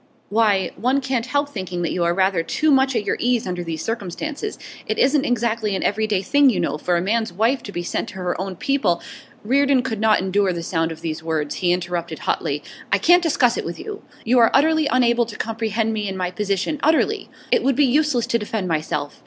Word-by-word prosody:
'Why, 205 Hz, -3 st, +2 dB
one 255 Hz, +6 st, +1 dB
can't 260 Hz, -3 st, -2 dB
help 285 Hz, +2 st, 0 dB
thinking 185 Hz, -8 st, -4 dB
that 170 Hz, -, -1 dB
you 175 Hz, -, -1 dB
are 170 Hz, -, +2 dB
rather 190 Hz, -2 st, +2 dB
too 305 Hz, -, +1 dB
much 265 Hz, -1 st, +3 dB
at 210 Hz, -, 0 dB
your -, -, 0 dB
ease 245 Hz, -1 st, +1 dB
under 180 Hz, -1 st, -3 dB
the 165 Hz, -2 st, -4 dB
circumstances. 235 Hz, -, -4 dB, 0.3 s
It 215 Hz, -, -1 dB
isn't 275 Hz, +1 st, +3 dB
exactly 230 Hz, -3 st, 0 dB
an -, -, -2 dB
everyday 210 Hz, -2 st, 0 dB
thing, 285 Hz, +2 st, +4 dB
you 200 Hz, -8 st, 0 dB
know, 150 Hz, -3 st, -1 dB
for 175 Hz, +1 st, +1 dB
a -, -, 0 dB
man's 220 Hz, +2 st, 0 dB
wife 230 Hz, +8 st, +1 dB
to 205 Hz, -, -8 dB
be 175 Hz, -2 st, -4 dB
sent -, -, -3 dB
back -, -, -9 dB
to 185 Hz, -, -6 dB
her 180 Hz, 0 st, -2 dB
own 190 Hz, -1 st, -4 dB
people 270 Hz, -5 st, 0 dB, 0.2 s
' -, -, -26 dB
Reardon 275 Hz, +2 st, +3 dB
could 225 Hz, -5 st, -3 dB
not 220 Hz, 0 st, +4 dB
endure 190 Hz, 0 st, +1 dB
the 170 Hz, -1 st, -5 dB
sound 165 Hz, -1 st, -1 dB
of 160 Hz, 0 st, -9 dB
these 160 Hz, -1 st, -4 dB
words. 160 Hz, -2 st, -2 dB
He 180 Hz, -2 st, +1 dB
interrupted 175 Hz, -2 st, -2 dB
hotly. -, -, -2 dB, 0.3 s
'I -, -, +4 dB
can't 355 Hz, +1 st, +5 dB
discuss 260 Hz, -7 st, +2 dB
it -, -, -2 dB
with 170 Hz, -, -5 dB
you. 420 Hz, -1 st, -7 dB, 0.2 s
You 245 Hz, +2 st, +4 dB
are 230 Hz, -, +6 dB
utterly 315 Hz, +2 st, +3 dB
unable 240 Hz, -3 st, +2 dB
to 210 Hz, -, -8 dB
comprehend 225 Hz, 0 st, -1 dB
me 210 Hz, -2 st, -2 dB
and 190 Hz, -, -5 dB
my 180 Hz, -1 st, -2 dB
position, 200 Hz, +9 st, -2 dB
utterly! 315 Hz, +1 st, +1 dB, 0.2 s
It -, -, +4 dB
would 270 Hz, -1 st, +1 dB
be 290 Hz, +2 st, +4 dB
useless 270 Hz, -2 st, +2 dB
to 235 Hz, -, 0 dB
defend 210 Hz, -2 st, -3 dB
myself. 155 Hz, -3 st, -2 dB
220 Hz, 230 wpm, -21 LUFS, 180-260 Hz, 0.3 s, are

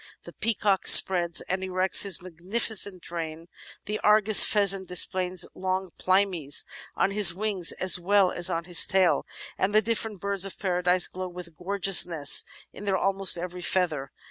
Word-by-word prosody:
The -, -, -14 dB
Peacock 210 Hz, -3 st, -3 dB
spreads 175 Hz, -3 st, +4 dB
and 190 Hz, +1 st, -6 dB
erects 185 Hz, 0 st, 0 dB
his 195 Hz, -3 st, 0 dB
magnificent 185 Hz, +2 st, 0 dB
train, 165 Hz, -1 st, -8 dB, 0.4 s
the 210 Hz, +1 st, -6 dB
Argus 210 Hz, 0 st, +4 dB
Pheasant 195 Hz, -2 st, 0 dB
displays 180 Hz, 0 st, 0 dB
long 185 Hz, 0 st, -5 dB
plimies 185 Hz, -6 st, -1 dB, 0.3 s
on 195 Hz, -, -1 dB
his 200 Hz, -4 st, +5 dB
wings 200 Hz, -3 st, -2 dB
as 185 Hz, -1 st, +3 dB
well 190 Hz, +1 st, 0 dB
as 175 Hz, +1 st, 0 dB
on 170 Hz, -1 st, -4 dB
his 175 Hz, 0 st, +3 dB
tail, 190 Hz, -2 st, -1 dB, 0.3 s
and 200 Hz, +2 st, -2 dB
the 215 Hz, -, +4 dB
different 225 Hz, -2 st, -5 dB
Birds 200 Hz, 0 st, -2 dB
of 195 Hz, -, -3 dB
Paradise 180 Hz, -1 st, 0 dB
glow 185 Hz, 0 st, -8 dB
with 175 Hz, -2 st, -13 dB
gorgeousness 180 Hz, -5 st, +2 dB, 0.3 s
in 205 Hz, -, -12 dB
their 195 Hz, -1 st, -2 dB
almost 195 Hz, -1 st, +3 dB
every 180 Hz, +1 st, -8 dB
feather. 160 Hz, -7 st, -3 dB
185 Hz, 155 wpm, -24 LUFS, 175-200 Hz, 0.4 s, his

